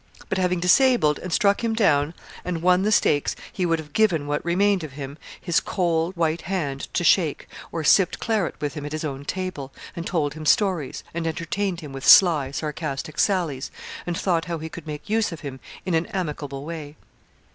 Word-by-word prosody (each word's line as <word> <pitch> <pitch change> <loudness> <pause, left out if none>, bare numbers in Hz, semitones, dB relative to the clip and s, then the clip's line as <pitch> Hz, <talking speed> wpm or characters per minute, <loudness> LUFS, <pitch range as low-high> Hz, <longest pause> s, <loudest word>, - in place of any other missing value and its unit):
But, 190 - 0
having 180 -1 +1
disabled, 180 - +4
and 185 - -6
struck 200 +5 +2
him 225 -1 0
down, 160 -7 +2 0.3
and 170 -2 -3
won 180 0 +4
the 210 +2 +1
stakes, 145 -8 +2 0.2
he 180 -2 0
would 165 -1 +2
have 150 -2 -10
given 180 -9 +2
what 145 0 -2
remained 190 +2 +2
of 150 -4 -7
him 140 0 -7 0.2
his 170 -3 +2
cold, 170 -1 -1
white 165 0 +1
hand 155 -7 -3
to - - +1
shake, 165 -2 +3 0.2
or 165 - -3
sipped 185 +4 +4
claret 215 -7 0
with 145 -1 -2
him 150 -2 -6
at 145 +1 -5
his 155 - -3
own 140 -1 -5
table, 185 -7 -4 0.2
and 170 - -5
told 150 -6 0
him 155 0 -6
stories, 185 - +1
and 165 0 -2
entertained 175 +3 -2
him 145 -3 -9
with 135 0 -7
sly, 165 -9 +7
sarcastic 150 0 -4
sallies, 165 -9 +1 0.4
and 175 -1 -1
thought 170 -4 0
how 170 -1 -3
he 160 +1 -6
could 160 -1 -10
make 150 +3 -6
use 220 0 +1
of 165 - -7
him 135 -3 -7 0.3
in 185 - -1
an 165 +1 +1
amicable 145 -6 -4
way. 155 -2 -7
165 Hz, 200 wpm, -24 LUFS, 150-185 Hz, 0.4 s, sly